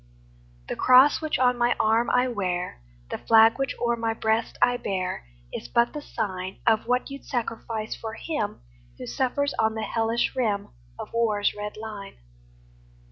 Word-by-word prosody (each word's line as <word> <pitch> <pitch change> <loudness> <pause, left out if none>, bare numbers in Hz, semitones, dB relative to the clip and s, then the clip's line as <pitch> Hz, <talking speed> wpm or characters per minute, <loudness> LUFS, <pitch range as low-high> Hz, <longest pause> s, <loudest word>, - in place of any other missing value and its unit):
The - - -3
cross 260 +5 +6
which 310 -1 -1
on 250 -1 +2
my 240 0 +3
arm 225 +2 +3
I 250 +1 +3
wear, 180 - -3 0.3
The - - -3
flag 225 +2 +5
which 270 - -1
o'er 235 0 +1
my 225 -1 -2
breast 220 +1 0
I 245 0 +3
bear, 185 - -3 0.3
Is - - -5
but 235 - +2
the 300 - -5
sign 190 -8 -4
Of 225 -1 +3
what 250 +3 0
you 275 - -6
'd - - -24
sacrifice 225 -3 -3
for 225 0 -6
him 230 - -3 0.4
Who - - -7
suffers 265 - -1
on 220 0 +2
the 220 - -3
hellish 230 +3 0
rim 215 -6 0 0.3
Of - - -8
war's 215 -3 +1
red 210 0 -6
line. 215 -2 -8
225 Hz, 170 wpm, -26 LUFS, 210-245 Hz, 0.4 s, cross